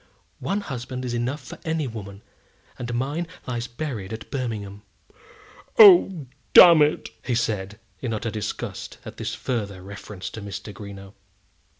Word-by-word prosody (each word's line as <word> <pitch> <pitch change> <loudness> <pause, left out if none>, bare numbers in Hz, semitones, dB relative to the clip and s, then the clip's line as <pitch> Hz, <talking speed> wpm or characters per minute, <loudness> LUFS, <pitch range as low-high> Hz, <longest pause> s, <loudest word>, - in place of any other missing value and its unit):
One 200 +1 -1
husband 130 -4 -5
is 120 - -3
enough 125 +4 -2
for - - -10
any 160 -2 -1
woman, 100 -4 -8 0.6
and 120 -1 -4
mine 140 +8 -1 0.2
lies 120 -1 -3
buried 120 -6 -5
at 110 0 -7
Birmingham." 105 -6 -4 1.0
"Oh, 350 - +8 0.3
damn 170 -3 +10
it!" 150 +1 +2 0.3
said 105 -4 -1 0.2
he, 130 - -4
in 115 - -1
utter 115 +1 -3
disgust 105 -2 -5
at - - -9
this - - -3
further 100 -7 -3
reference 100 0 -8
to 110 - -7
Mr. 100 +1 -7
Greenow. 100 0 -10
120 Hz, 140 wpm, -24 LUFS, 100-140 Hz, 1.0 s, damn